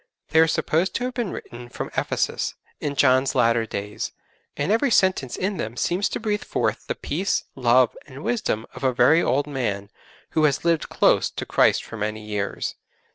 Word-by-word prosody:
They 160 Hz, -, +4 dB
are 160 Hz, -, +6 dB
supposed 165 Hz, +3 st, 0 dB
to 245 Hz, -, -1 dB
have 250 Hz, 0 st, -2 dB
been 240 Hz, -6 st, -2 dB
written 120 Hz, 0 st, -8 dB
from -, -, -6 dB
Ephesus, -, -, -1 dB, 0.2 s
in 145 Hz, -1 st, -3 dB
John's 130 Hz, 0 st, +3 dB
latter 115 Hz, -2 st, +3 dB
days, 105 Hz, 0 st, -4 dB, 0.4 s
and 145 Hz, +7 st, 0 dB
every 230 Hz, +6 st, +3 dB
sentence 185 Hz, -, +2 dB
in 195 Hz, +1 st, -1 dB
them 110 Hz, +3 st, -4 dB
seems 180 Hz, +9 st, +1 dB
to -, -, -3 dB
breathe 210 Hz, -2 st, -1 dB
forth -, -, -2 dB
the -, -, -2 dB
peace, 185 Hz, +7 st, -1 dB
love, 125 Hz, -1 st, +3 dB
and 140 Hz, +1 st, -10 dB
wisdom 215 Hz, -, -1 dB
of -, -, -10 dB
a 130 Hz, -1 st, +2 dB
very 130 Hz, +8 st, +5 dB
old 140 Hz, +1 st, +1 dB
man 110 Hz, -8 st, -3 dB, 0.4 s
who 155 Hz, -1 st, +3 dB
has 145 Hz, +2 st, +1 dB
lived 165 Hz, -2 st, +1 dB
close -, -, +3 dB
to -, -, -6 dB
Christ -, -, +3 dB
for 115 Hz, -, -9 dB
many 105 Hz, 0 st, -3 dB
years. 105 Hz, -2 st, -3 dB
135 Hz, 185 wpm, -24 LUFS, 120-175 Hz, 0.4 s, are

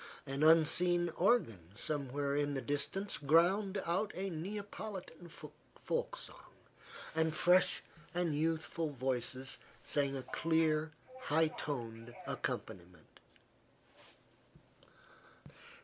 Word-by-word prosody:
An 135 Hz, 0 st, -3 dB
unseen 170 Hz, +2 st, +5 dB
organ 180 Hz, -, +2 dB, 0.2 s
somewhere 140 Hz, +1 st, -1 dB
in 145 Hz, 0 st, 0 dB
the 135 Hz, -, -1 dB
distance 145 Hz, +8 st, 0 dB
ground 185 Hz, +7 st, +3 dB
out 185 Hz, +5 st, 0 dB
a 190 Hz, +1 st, -3 dB
Neapolitan 195 Hz, +1 st, -6 dB
folk 150 Hz, -1 st, -5 dB
song, -, -, -7 dB, 0.7 s
and 160 Hz, 0 st, +1 dB
fresh 180 Hz, +3 st, +4 dB, 0.3 s
and 175 Hz, -3 st, 0 dB
youthful 160 Hz, +1 st, 0 dB
voices 130 Hz, -1 st, -3 dB, 0.2 s
sang 140 Hz, -2 st, 0 dB
a 130 Hz, -, -5 dB
clear, 160 Hz, 0 st, +1 dB, 0.3 s
high 160 Hz, +2 st, +3 dB
toned 120 Hz, -6 st, -5 dB
accompaniment. 90 Hz, 0 st, -5 dB
155 Hz, 90 wpm, -35 LUFS, 140-175 Hz, 0.7 s, unseen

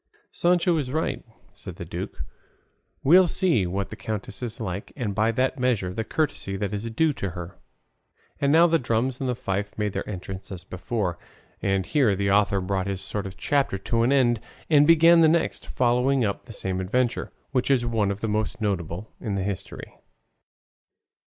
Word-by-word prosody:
"Sancho 175 Hz, 0 st, +2 dB
is 140 Hz, -5 st, -2 dB
right," 155 Hz, +3 st, -1 dB, 0.3 s
said -, -, -7 dB
the -, -, -7 dB
duke; -, -, -6 dB, 0.8 s
"we'll 180 Hz, +6 st, +7 dB
see 165 Hz, -, +2 dB
what 95 Hz, +2 st, -3 dB
the -, -, -5 dB
countess 105 Hz, -1 st, -5 dB
is 120 Hz, -2 st, -5 dB
like, 100 Hz, -2 st, -4 dB
and 115 Hz, -7 st, -2 dB
by 110 Hz, +2 st, +2 dB
that 130 Hz, +3 st, 0 dB
measure 110 Hz, -8 st, 0 dB
the 110 Hz, -, -2 dB
courtesy 140 Hz, -9 st, -1 dB
that 100 Hz, 0 st, -3 dB
is 105 Hz, +3 st, -3 dB
due 155 Hz, +7 st, +2 dB
to 100 Hz, -, -3 dB
her." 85 Hz, 0 st, -8 dB, 0.8 s
And 140 Hz, 0 st, +2 dB
now 165 Hz, +3 st, +7 dB
the 165 Hz, -1 st, +3 dB
drums 120 Hz, +2 st, -1 dB
and 125 Hz, -2 st, -1 dB
fife 100 Hz, -4 st, -3 dB
made 105 Hz, -2 st, -1 dB
their -, -, -4 dB
entrance 95 Hz, 0 st, -7 dB
as 90 Hz, -2 st, -7 dB
before; 90 Hz, 0 st, -3 dB, 0.4 s
and 95 Hz, -1 st, +1 dB
here 130 Hz, -7 st, +2 dB
the 100 Hz, 0 st, 0 dB
author 100 Hz, -1 st, +3 dB
brought 95 Hz, 0 st, -1 dB
this 95 Hz, -1 st, -3 dB
short 100 Hz, -2 st, -3 dB
chapter 140 Hz, -8 st, +1 dB
to 115 Hz, +4 st, 0 dB
an 120 Hz, +3 st, +3 dB
end 120 Hz, -4 st, +3 dB, 0.3 s
and 145 Hz, -1 st, +6 dB
began 165 Hz, +1 st, +7 dB
the 160 Hz, -, +7 dB
next, 165 Hz, +1 st, 0 dB
following 125 Hz, +1 st, +2 dB
up 100 Hz, -, -3 dB
the -, -, -9 dB
same 95 Hz, -2 st, -2 dB
adventure, 120 Hz, +6 st, 0 dB, 0.2 s
which 125 Hz, +1 st, 0 dB
is 130 Hz, -3 st, +3 dB
one 110 Hz, -4 st, +1 dB
of 100 Hz, +1 st, -3 dB
the 115 Hz, -, -1 dB
most 110 Hz, +1 st, -1 dB
notable 95 Hz, -1 st, -3 dB
in 105 Hz, -3 st, -3 dB
the 95 Hz, -, -1 dB
history. 100 Hz, -2 st, -5 dB
110 Hz, 185 wpm, -25 LUFS, 100-130 Hz, 0.8 s, we'll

